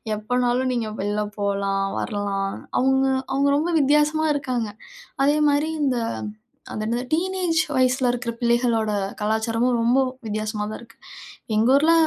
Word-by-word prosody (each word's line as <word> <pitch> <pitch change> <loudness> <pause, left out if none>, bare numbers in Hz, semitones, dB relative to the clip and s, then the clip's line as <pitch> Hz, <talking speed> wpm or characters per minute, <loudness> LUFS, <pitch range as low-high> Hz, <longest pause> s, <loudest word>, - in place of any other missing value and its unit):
எப்போனாலும் 245 +4 0
நீங்கள் 225 -3 -2
வெளியில 205 +2 -1 0.2
போலாம், 200 -1 0
வரலாம். 200 -2 -2 0.3
அவங்க 265 +1 +3 0.3
அவங்க 275 +1 +2
ரொம்ப 310 +4 0
வித்தியாசமா 300 +2 +3
இருக்காங்க. 255 -5 -2 0.6
அதேமாரி 295 +1 +3
இந்த 260 -4 +1 0.7
அது 215 - -4
என்னது 240 +3 -1
டீனேஜ் 360 0 0 0.2
வயசுல 255 0 +2
இருக்கிற 245 -1 -3
பிள்ளைகளோட 235 -2 +2 0.3
கலாச்சாரமும், 225 +3 +1
ரொம்ப 240 +3 +3 0.3
வித்தியாசமாதான் 215 0 -3
இருக்கு. 230 -1 -17 0.6
எங்க 220 +3 +3
ஊருல 310 +4 +4
245 Hz, 120 wpm, -23 LUFS, 215-280 Hz, 0.7 s, ஊருல